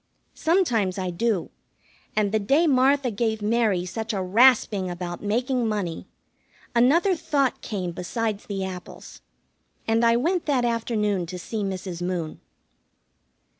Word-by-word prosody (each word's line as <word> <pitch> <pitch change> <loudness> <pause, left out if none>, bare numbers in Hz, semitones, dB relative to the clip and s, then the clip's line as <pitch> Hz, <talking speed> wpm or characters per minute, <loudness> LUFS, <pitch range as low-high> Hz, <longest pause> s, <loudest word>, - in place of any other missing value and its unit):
Sometimes 245 - +1
I 185 -1 -2
do, 205 0 -1 0.6
and 210 -2 +1
the 220 - +2
day 275 +11 +3
Martha 270 -2 +3
gave 220 +1 -1
Mary 210 -5 +1
such 220 +5 -4
a 195 - -1
rasping 210 -2 +4
about 175 -1 -5
making 245 +3 0
money, 200 -6 -3 0.7
another 315 +11 +4
thought 285 -5 0
came 185 -5 -3
besides 210 +4 -3
the 195 -2 -3
apples, 185 -1 -9 0.7
and 225 +1 +2
I 230 0 +5
went 335 +7 0
that 260 -4 +2
afternoon 210 -6 0
to 180 +2 -6
see 215 +4 -4
Mrs. 185 -2 -4
Moon. 175 -3 -3
220 Hz, 130 wpm, -24 LUFS, 185-245 Hz, 0.7 s, I